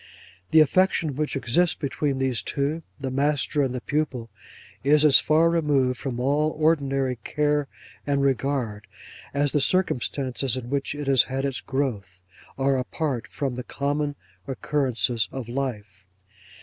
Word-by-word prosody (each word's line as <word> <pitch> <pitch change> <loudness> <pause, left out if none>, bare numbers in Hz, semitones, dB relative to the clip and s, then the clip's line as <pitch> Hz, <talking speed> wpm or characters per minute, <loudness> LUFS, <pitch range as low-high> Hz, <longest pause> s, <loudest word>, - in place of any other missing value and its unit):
The 160 - +6
affection 165 -2 +2
which 150 +1 -2
exists 135 +7 +2
between 140 0 -2
these 130 -5 0
two—the 140 - -3
master 145 +2 +1
and 135 -3 0
the 125 - -4
pupil—is 145 +1 -1
as 140 -3 +8
far 155 +3 +3
removed 145 -7 +1
from 125 -3 -4
all 145 +4 +1
ordinary 135 -5 +1
care 150 +3 0 0.4
and 140 -1 +1
regard, 125 -5 -1 0.4
as 140 0 +1
the 145 - +1
circumstances 135 -6 +1
in 125 0 -6
which 140 +1 -1
it 145 0 -5
has 135 -2 +6
had 135 +1 -3
its 135 -1 -2
growth, 115 -10 -3 0.4
are 135 0 +2
apart 130 -1 -3
from 135 -3 -3
the 125 +1 -5
common 145 +2 -2 0.3
occurrences 125 -6 0
of 130 -4 -6
life. 105 -7 -5
135 Hz, 135 wpm, -25 LUFS, 125-150 Hz, 0.4 s, as